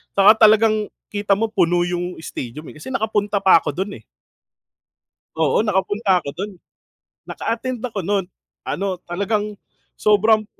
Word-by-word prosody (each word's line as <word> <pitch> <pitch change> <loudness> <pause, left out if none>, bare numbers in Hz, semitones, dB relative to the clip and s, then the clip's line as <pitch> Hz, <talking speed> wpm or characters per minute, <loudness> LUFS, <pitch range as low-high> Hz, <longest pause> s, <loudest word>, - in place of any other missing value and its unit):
tsaka 205 +2 +7
talagang 215 0 +3 0.2
kita 205 -1 0
mo, 220 +3 0
puno 175 -4 +2
yung 175 0 -2
stadium 145 +2 -7
eh, - - -13
kasi 260 +12 -8
nakapunta 210 -4 0
pa 190 -3 +7
ako 150 -3 -2
do'n 190 +3 -4
eh. - - -23 1.3
Oo, 160 0 +2
nakapunta 205 -1 +1
ako 140 - -4
do'n. 200 +5 -5 0.7
Naka-attend 240 +1 -3
ako 240 -5 -4
no'n, 200 -2 +1 0.4
ano, 190 -2 -3
talagang 205 +3 -2 0.4
sobrang 215 +1 +3
200 Hz, 135 wpm, -21 LUFS, 180-215 Hz, 1.3 s, tsaka